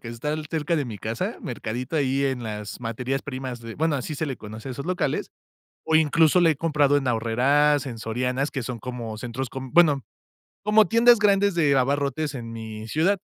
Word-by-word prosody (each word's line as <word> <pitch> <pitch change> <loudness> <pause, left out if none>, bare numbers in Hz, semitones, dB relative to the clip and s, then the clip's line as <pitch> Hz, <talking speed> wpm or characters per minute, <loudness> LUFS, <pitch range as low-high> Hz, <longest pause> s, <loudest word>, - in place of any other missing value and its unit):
que 115 - -8
está 120 +6 -3 0.2
cerca 160 +1 0
de 150 -3 0
mi 110 -5 -7
casa, - - -3
mercadito 120 +6 -5
ahí 140 -1 +1
en 130 -3 -1
las 105 -1 -6
materias 125 +4 -3
primas 130 -3 -5
de 115 -1 -8
bueno, 160 0 +1
así 145 +3 -3
se 160 - -2
le 135 -3 -4
conoce 110 +3 -9
a - - -4
esos 140 +2 -6
locales, 180 -6 -1 0.5
o 160 - 0
incluso 160 +2 +4
la 170 -2 +5
he 155 - 0
comprado 145 -3 +2
en 135 -2 -1
Aurrerás, 130 +5 +2
en 120 -4 -6
Sorianas, 125 +5 -1
que 135 -4 -4
son 120 -2 -5
como 120 -3 -5
centros 125 +3 -4
com 130 +1 -7
bueno, 150 -6 +5 0.6
como 210 +1 +5
tiendas 235 +4 +6
grandes 200 -1 +3
de 150 -5 +3
abarrotes 140 +2 0
en 115 -3 -6
mi 110 -1 -7
ciudad. 170 - +2
135 Hz, 200 wpm, -24 LUFS, 120-155 Hz, 0.6 s, tiendas